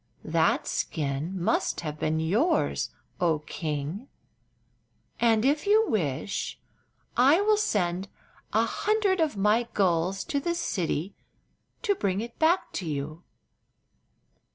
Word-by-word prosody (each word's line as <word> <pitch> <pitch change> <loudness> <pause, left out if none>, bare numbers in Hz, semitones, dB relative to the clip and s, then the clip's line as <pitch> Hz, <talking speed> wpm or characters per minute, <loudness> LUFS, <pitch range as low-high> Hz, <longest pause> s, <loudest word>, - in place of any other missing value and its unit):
That - - +2
skin 150 +5 -2
must 175 - 0
have 155 -2 -5
been 155 +1 0
yours, 215 - +1 0.3
oh 170 -4 +2
king, 155 - -4 1.1
and 225 -1 +3
if 295 +7 +1
you 435 +2 +5
wish 170 0 -2 0.6
I 275 +8 +5
will 425 +1 +4
sent 190 - 0 0.4
an - - +3
hundred 420 -3 +1
of 310 -9 +1
my 210 +4 +3
gulls 185 0 +1
to 285 - -1
the 340 +4 -1
city 180 - -2 0.7
to 415 -4 +3
bring 195 - -1
it 235 +2 -7
back 335 +4 +3
to 180 - -6
you." 155 +2 -4
200 Hz, 120 wpm, -27 LUFS, -, 1.1 s, you